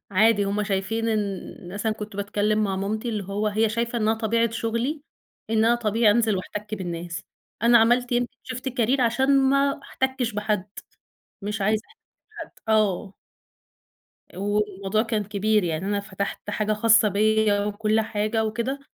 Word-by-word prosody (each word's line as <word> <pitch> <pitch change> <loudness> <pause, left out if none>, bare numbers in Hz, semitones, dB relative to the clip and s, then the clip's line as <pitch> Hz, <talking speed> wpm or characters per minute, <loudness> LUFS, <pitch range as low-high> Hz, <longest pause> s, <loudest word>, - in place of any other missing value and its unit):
عادي 205 +1 +4
هم 205 +1 -1
شايفين 205 +3 -1
إن 200 -4 -3
مثلًا 215 +2 -1
كنت 210 -1 -8
باتكلّم 210 +1 0
مع 195 -1 -1
مامتي 215 +4 -2
اللي 210 -3 -2
هو 200 +3 -2
هي 215 +1 +2
شايفة 235 +2 -1
إنّها 220 +1 +2
طبيعة 230 +1 +1
شغلي 230 +6 -2 0.5
إن 220 0 +3
أنا 235 - +5
طبيعي 225 -1 +2
أنزل 220 -1 +2
وأحتَك 210 +3 -5
بالناس. 175 -3 -5 0.4
أنا 235 0 +7
عملت 245 +2 +3
يمكن 240 0 0
شيفت 255 +1 -5
كارير 250 +1 +1
عشان 265 +4 +3
ما 275 0 +2
أحتكِّش 260 -3 -2
بحد، 210 -1 -1 0.7
مش 210 +1 -3
عايزة 215 +2 +1
أحت - - -26 0.4
بحد - - -25 0.2
آه. 210 -2 +1 1.2
والموضوع 205 +1 0
كان 220 -3 -1
كبير. 210 +1 +1
يعني 165 +1 -2
أنا 205 0 0
فتحت 200 0 -5
حاجة 215 0 0
خاصة 225 0 +5
بيّا 210 0 +2
وكل 215 +1 +1
حاجة 220 +1 -1
وكده، 235 +6 -2
215 Hz, 150 wpm, -24 LUFS, 205-230 Hz, 1.2 s, أنا